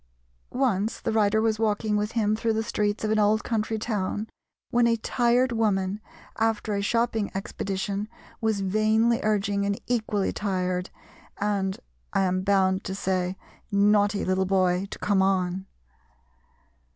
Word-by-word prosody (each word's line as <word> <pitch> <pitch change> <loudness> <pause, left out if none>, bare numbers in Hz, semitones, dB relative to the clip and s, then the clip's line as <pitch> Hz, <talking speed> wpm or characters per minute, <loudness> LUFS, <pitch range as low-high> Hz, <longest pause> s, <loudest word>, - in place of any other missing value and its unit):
Once 225 -5 0
the - - -2
writer 215 -1 +3
was 220 -1 +1
walking 215 -1 +1
with 210 +1 -1
him 215 -2 +2
through 225 +1 0
the 220 0 0
streets 210 -1 -1
of 215 - 0
an 220 - +2
old 210 +1 +3
country 220 -1 -1
town 210 -1 -2 0.4
when 240 0 +4
a 230 - +3
tired 240 +2 +2
woman 205 -3 0 0.4
after 220 -1 0
a 200 - 0
shopping 225 0 0
expedition 195 +1 -3 0.3
was 220 -3 0
vainly 215 +4 +2
urging 205 -1 +1
an 200 0 0
equally 215 -5 0
tired, 185 -2 -1 0.5
and, 195 -2 -1 0.4
I - - +2
am 185 -1 +1
bound 190 -1 +2
to 190 - -3
say, 185 -1 -1 0.3
naughty 205 0 +3
little 185 0 +1
boy 185 0 +2
to - - -7
"come 200 -2 +1
on." 190 0 0
205 Hz, 145 wpm, -26 LUFS, 195-220 Hz, 0.5 s, when